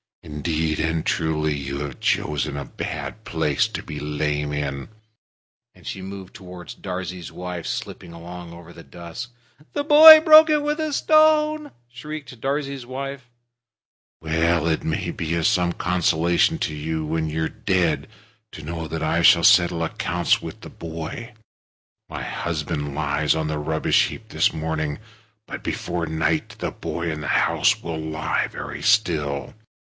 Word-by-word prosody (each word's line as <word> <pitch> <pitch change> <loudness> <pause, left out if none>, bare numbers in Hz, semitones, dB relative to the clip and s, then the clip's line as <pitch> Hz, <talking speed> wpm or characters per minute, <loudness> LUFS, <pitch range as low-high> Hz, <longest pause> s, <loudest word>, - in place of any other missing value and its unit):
Indeed 80 0 -2
and 80 0 -1
truly, 80 -2 0
you've 70 0 -5
chosen 75 -2 0
a 70 - -5
bad 110 - -6
place 80 -6 0
to - - -6
be 75 - -7
lame 75 0 -2
in." 70 0 -3 0.9
And - - -19
she 95 - -5
moved 95 0 -8
toward 90 -3 -10
Darzee's 90 -2 -5
wife, 90 -2 -6
slipping 85 - -5
along 85 +1 -9
over 85 0 -12
the 85 - -12
dust. 85 +8 -8 0.4
"The 290 - -1
boy 310 +2 +11
broke 315 0 +8
it 300 -1 +2
with 300 +1 -1
a 310 -1 -2
stone!" 310 -1 +3 0.2
shrieked 130 +1 -9
Darzee's 140 -2 -2
wife. 135 0 -6 0.9
"Well! 80 +1 +1
It 80 -2 0
may 85 +2 -2
be 85 0 -2
some 90 -5 +2
consolation 85 -1 +1
to - - -2
you 80 +1 -3
when 80 0 -1
you're 80 +1 -1
dead 95 -5 0 0.5
to 80 - -9
know 80 +1 -5
that 80 0 -4
I - - +1
shall - - +6
settle 85 -1 +5
accounts 85 +1 0
with - - -8
the - - -9
boy. 85 +9 -7 0.8
My - - -5
husband 75 -1 -3
lies 75 0 +1
on 80 -1 -1
the 75 -1 -2
rubbish 80 +1 +2
heap - - -10
this - - +2
morning, 80 -2 -2 0.5
but - - -8
before 85 -1 -3
night 80 0 -1
the - - -3
boy 85 -1 -4
in 75 -1 -5
the 75 - -5
house - - +2
will 80 -1 -4
lie 80 0 -1
very - - -7
still. 80 - +1
85 Hz, 150 wpm, -23 LUFS, 80-100 Hz, 0.9 s, boy